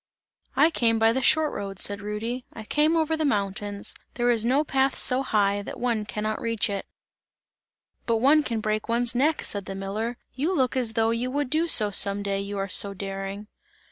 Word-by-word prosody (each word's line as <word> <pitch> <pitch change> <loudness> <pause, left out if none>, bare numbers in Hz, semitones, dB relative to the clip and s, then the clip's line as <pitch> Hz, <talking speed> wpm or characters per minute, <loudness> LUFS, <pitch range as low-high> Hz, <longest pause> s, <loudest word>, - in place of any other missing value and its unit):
"I 325 - +4
came 230 -6 +1
by 225 0 +3
the 265 - -1
short 310 +3 +3
road," 195 -1 -6
said 205 +1 +1
Rudy, 220 +5 -4
"I 220 - -9
came 305 +8 +1
over 320 0 +1
the 315 - -2
mountains; 205 -4 -1 0.2
there 245 0 +2
is 225 -2 +1
no 265 +5 +2
path 270 -2 0
so 255 +1 +2
high, 205 -5 +1
that - - -8
one 235 -3 -1
can 210 0 -5
not 215 0 -2
reach 230 -3 -1
it!" 200 -1 -4 1.2
"But 230 -1 +2
one 280 +7 +4
can 230 -6 -3
break 215 +1 -2
one's 235 0 +1
neck," 295 +6 +1
said 200 -2 -3
the 195 - -6
miller, 210 +5 -4 0.2
"you 310 +8 -1
look 260 -4 0
as 240 -4 -1
though 225 0 +1
you 235 +2 -2
would 280 0 -2
do 320 +2 +1
so 210 -10 +6
some 200 0 +3
day, 200 -1 -2
you 200 0 -5
are 195 0 -2
so 200 +1 +4
daring!" 195 +1 -6
225 Hz, 205 wpm, -25 LUFS, 205-260 Hz, 1.2 s, so